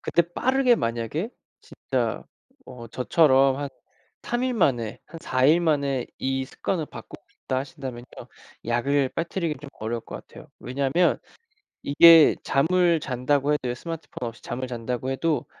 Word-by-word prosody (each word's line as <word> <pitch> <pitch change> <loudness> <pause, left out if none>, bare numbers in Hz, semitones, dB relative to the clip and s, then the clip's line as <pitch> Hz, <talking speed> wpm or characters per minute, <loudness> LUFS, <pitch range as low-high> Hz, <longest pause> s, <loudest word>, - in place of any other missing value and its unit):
그때 170 - +2
빠르게 250 +9 +2
만약에 120 - -2 0.6
진짜 - - 0 0.4
어 120 -2 -10
저처럼 135 +1 +3
'한 145 0 -3 0.5
3 240 +1 -2
일 255 -1 0
만에 120 - 0
한 165 +2 -10
4 130 -5 0
일 160 +5 +5
만에 140 -6 0
이 135 0 -1
습관을 160 +4 -3
바꾸고 - - -12
싶다.' 130 - -4
하신다면요, 130 -3 -7 0.6
약을 130 +3 +1
빠뜨리기는 165 -2 -3
좀 145 -2 -10
어려울 115 +2 -3
것 - - -8
같아요. - - -13
왜냐하면 140 +7 +1 0.6
이게 165 +2 +7
잠을 170 +3 +2
잔다고 140 +3 0
해도요 125 -4 -1
스마트폰 160 -3 -6
없이 115 - -15
잠을 130 +2 -4
잔다고 125 +1 -4
해도 155 +3 -1
140 Hz, 300 characters per minute, -25 LUFS, 125-165 Hz, 0.6 s, 이게